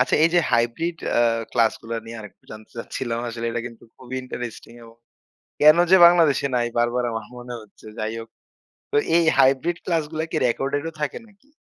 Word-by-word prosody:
আচ্ছা 125 Hz, -, +2 dB
এই 165 Hz, -, +5 dB
যে, 175 Hz, -, +6 dB
hybrid 120 Hz, +9 st, 0 dB, 0.2 s
আ -, -, +4 dB, 0.3 s
ক্লাস 115 Hz, -2 st, +3 dB
গুলা 115 Hz, 0 st, -4 dB
নিয়ে 115 Hz, 0 st, -8 dB
আরেকটু 105 Hz, -2 st, -14 dB
জানতে 110 Hz, 0 st, -12 dB
চাচ্ছিলাম। 115 Hz, 0 st, -4 dB
আসলে 115 Hz, 0 st, -5 dB
এটা 120 Hz, -, -2 dB
কিন্তু 115 Hz, -1 st, -12 dB
খুবই 130 Hz, 0 st, -8 dB
ইন্টারেস্টিং 120 Hz, -2 st, -7 dB
এবং 115 Hz, 0 st, -16 dB, 0.6 s
কেন 155 Hz, +2 st, +8 dB
যে, 190 Hz, -, +8 dB
বাংলাদেশে 165 Hz, -5 st, +4 dB
নাই 120 Hz, -, +1 dB
বারবার 120 Hz, +1 st, +1 dB
আমার 110 Hz, -1 st, -4 dB
মনে 125 Hz, 0 st, -9 dB
হচ্ছে 105 Hz, -, -19 dB
যাই 110 Hz, +1 st, -2 dB
হোক। 115 Hz, -, -10 dB, 0.6 s
তো -, -, +1 dB, 0.2 s
এই 170 Hz, -, +4 dB
hybrid 135 Hz, +6 st, +3 dB
ক্লাসগুলা 160 Hz, -2 st, -1 dB
কি -, -, -3 dB
রেকর্ডেড 135 Hz, +4 st, -1 dB
ও -, -, -4 dB
থাকে 150 Hz, -2 st, -2 dB
নাকি? 210 Hz, +7 st, -26 dB
125 Hz, 185 wpm, -23 LUFS, 115-155 Hz, 0.6 s, কেন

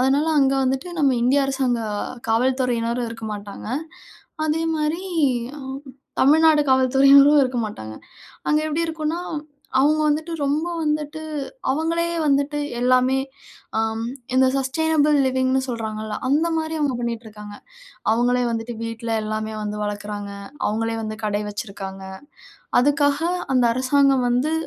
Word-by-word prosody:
அதனால 275 Hz, +4 st, +2 dB
அங்க 270 Hz, 0 st, +3 dB
வந்துட்டு 265 Hz, +6 st, -1 dB
நம்ம 275 Hz, -3 st, +4 dB
இந்திய 275 Hz, +3 st, +3 dB
அரசாங்க 265 Hz, -3 st, 0 dB, 0.5 s
காவல்துறையினரும் 245 Hz, -1 st, +1 dB
இருக்கமாட்டாங்க. 210 Hz, -2 st, -7 dB, 0.8 s
அதே 315 Hz, +2 st, 0 dB
மாரி 310 Hz, +3 st, -1 dB, 0.6 s
அம் 265 Hz, -1 st, -6 dB, 0.4 s
தமிழ்நாடு 310 Hz, +2 st, +5 dB
காவல்துறையினரும் 275 Hz, +3 st, +6 dB
இருக்க 255 Hz, -1 st, -1 dB
மாட்டாங்க. 110 Hz, -, -8 dB, 0.5 s
அங்க 300 Hz, -, +4 dB
எப்படி 310 Hz, +2 st, 0 dB
இருக்கும்னா 320 Hz, +1 st, -2 dB, 0.6 s
அவங்க 305 Hz, +2 st, +3 dB
வந்துட்டு 310 Hz, +3 st, 0 dB
ரொம்ப 295 Hz, +4 st, 0 dB, 0.2 s
வந்துட்டு 300 Hz, 0 st, -2 dB, 0.5 s
அவங்களே 330 Hz, +4 st, 0 dB, 0.2 s
வந்துட்டு 285 Hz, +1 st, +1 dB, 0.2 s
எல்லாமே 255 Hz, +1 st, +3 dB, 0.6 s
அம் 220 Hz, 0 st, -1 dB, 0.3 s
இந்த 260 Hz, 0 st, +5 dB
சஸ்டெய்னபிள் 300 Hz, +2 st, +2 dB
லிவிங் 260 Hz, 0 st, +1 dB
ன்னு 265 Hz, -, +3 dB
சொல்கிறாங்கல்ல 220 Hz, -2 st, -4 dB
அந்த 305 Hz, +5 st, +2 dB
மாரி 320 Hz, 0 st, -2 dB
அவங்க 290 Hz, -4 st, 0 dB
பண்ணிட்டிருக்காங்க. 220 Hz, -3 st, -6 dB, 0.6 s
அவங்களே 245 Hz, +2 st, +2 dB
வந்துட்டு 230 Hz, +1 st, -4 dB
வீட்ல 230 Hz, 0 st, -4 dB
எல்லாமே 215 Hz, 0 st, -3 dB
வந்து 210 Hz, 0 st, -4 dB
வளர்க்குறாங்க. 205 Hz, 0 st, -4 dB, 0.4 s
அவங்களே 225 Hz, +1 st, -1 dB
வந்து 215 Hz, 0 st, -5 dB
கடை 210 Hz, -1 st, 0 dB
வச்சிருக்காங்க. 195 Hz, -2 st, -7 dB, 0.8 s
அதுக்காக 285 Hz, +1 st, +2 dB, 0.4 s
அந்த 250 Hz, -1 st, +4 dB
அரசாங்கம் 265 Hz, 0 st, +3 dB
வந்து 250 Hz, +6 st, +1 dB
260 Hz, 120 wpm, -22 LUFS, 225-295 Hz, 0.8 s, காவல்துறையினரும்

